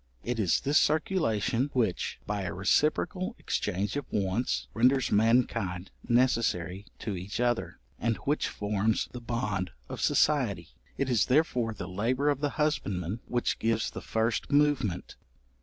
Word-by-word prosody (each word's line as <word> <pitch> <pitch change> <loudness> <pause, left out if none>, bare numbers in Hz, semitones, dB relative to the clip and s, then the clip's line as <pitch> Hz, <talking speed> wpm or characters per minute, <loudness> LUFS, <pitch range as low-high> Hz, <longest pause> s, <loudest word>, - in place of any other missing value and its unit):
It 120 -1 -2
is 95 -6 +2
this 145 +3 +4
circulation, 140 - +1
which, 115 -8 0
by 105 -1 -2
a 90 -3 -4
reciprocal 155 - +1
exchange 100 +5 -2
of 145 -3 -4
wants, 100 +4 0
renders 125 +3 +3
mankind 110 -4 +2 0.2
necessary 110 -6 +1
to 105 -4 -4
each 95 +5 -5
other, 120 -1 0 0.2
and 115 -1 +1
which 145 +2 +1
forms 105 +1 0
the 125 - -7
bond 105 -6 -2 0.2
of - - -5
society: 105 - +2 0.3
it 140 - 0
is 120 -6 +2
therefore 125 -5 +2
the 90 - -6
labour 125 +10 +1
of 140 - -2
the 145 0 0
husbandman 100 - -1
which 120 -1 -1
gives 115 -1 0
the - - -7
first 115 +4 -1
movement. 145 -11 +1
115 Hz, 140 wpm, -29 LUFS, 100-130 Hz, 0.3 s, this